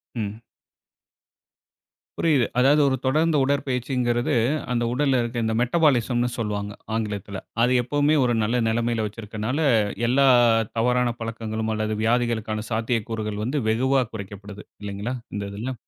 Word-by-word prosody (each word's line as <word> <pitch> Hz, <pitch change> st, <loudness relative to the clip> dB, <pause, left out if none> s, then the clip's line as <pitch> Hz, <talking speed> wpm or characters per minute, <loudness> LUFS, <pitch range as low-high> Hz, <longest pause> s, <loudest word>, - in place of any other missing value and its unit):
ம். 110 Hz, 0 st, -4 dB, 1.8 s
புரியுது. 145 Hz, -7 st, +3 dB
அதாவது 145 Hz, +4 st, +5 dB
ஒரு 130 Hz, -, +2 dB
தொடர்ந்த 155 Hz, +4 st, +2 dB
உடற்பயிற்சிங்கிறது 125 Hz, -3 st, 0 dB, 0.4 s
அந்த 120 Hz, -1 st, +1 dB
உடல்ல 135 Hz, -1 st, +2 dB
இருக்க 120 Hz, +1 st, -4 dB
இந்த 110 Hz, -, 0 dB
மெட்டபாலிசம்னு 125 Hz, -4 st, +2 dB
சொல்வாங்க 105 Hz, -2 st, -3 dB, 0.2 s
ஆங்கிலத்தில. 105 Hz, -3 st, -4 dB, 0.2 s
அது 125 Hz, -, +3 dB
எப்பவுமே 145 Hz, +4 st, +2 dB
ஒரு 120 Hz, -, +2 dB
நல்ல 120 Hz, +3 st, 0 dB
நிலைமையில 115 Hz, 0 st, 0 dB
வைத்திருப்பதனால 110 Hz, +4 st, -4 dB, 0.5 s
எல்லா 135 Hz, +3 st, +4 dB, 0.5 s
தவறான 125 Hz, +1 st, +2 dB
பழக்கங்களும் 110 Hz, -1 st, -3 dB
அல்லது 110 Hz, 0 st, -1 dB
வியாதிகளுக்கான 110 Hz, -2 st, 0 dB
சாத்தியக்கூறுகள் 110 Hz, -2 st, -2 dB
வந்து 135 Hz, +6 st, -1 dB
வெகுவா 130 Hz, +4 st, +2 dB
குறைக்கப்படுது 100 Hz, 0 st, -8 dB, 0.2 s
இல்லேங்களா? 105 Hz, +5 st, -4 dB, 0.2 s
இந்த 100 Hz, -1 st, -3 dB
இதில. 120 Hz, +6 st, -4 dB
115 Hz, 115 wpm, -24 LUFS, 110-130 Hz, 1.8 s, அதாவது